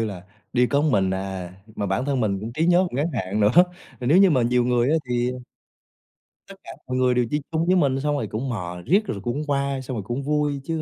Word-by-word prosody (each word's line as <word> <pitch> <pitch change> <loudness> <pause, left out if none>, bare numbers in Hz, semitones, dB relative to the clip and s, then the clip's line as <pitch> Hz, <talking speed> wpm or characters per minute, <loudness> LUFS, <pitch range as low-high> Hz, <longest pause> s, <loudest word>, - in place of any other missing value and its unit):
như - - +1
là, 100 -4 -6 0.3
đi 125 0 +3
có 140 +3 +1
mình 100 -11 +2
à, 95 -1 -4 0.2
mà 100 - -2
bản 95 +6 -1
thân 140 -2 0
mình 100 -4 0
cũng 110 +3 -6
trí 160 +6 0
nhớ 180 +2 +4
ngắn 140 +5 -1
hạn 105 -4 -2
nữa, 105 0 +4 0.5
nếu 135 +8 +4
như 195 -1 +6
mà 130 -6 +3
nhiều 120 +1 +2
người 125 +1 +2
á 160 - +3
thì 120 0 0 1.2
tất - - -10
cả - - -9 0.2
mọi 125 0 -2
người 130 -1 +3
đều 125 -1 +2
đi 150 +3 -1
chung 160 0 0
với 185 +2 +3
mình 140 -6 +2
xong 145 +1 0
rồi 140 - -2
cũng 120 +5 -4
mò 90 -6 -5
riết 200 +7 +3
rồi 100 - -4
cũng 120 +5 -2
qua, 140 -1 -1
xong 130 -2 -5
rồi 105 - -4
cũng 120 +7 -4
vui 145 -1 0
chứ 160 +2 -3
125 Hz, 250 wpm, -23 LUFS, 110-145 Hz, 1.2 s, như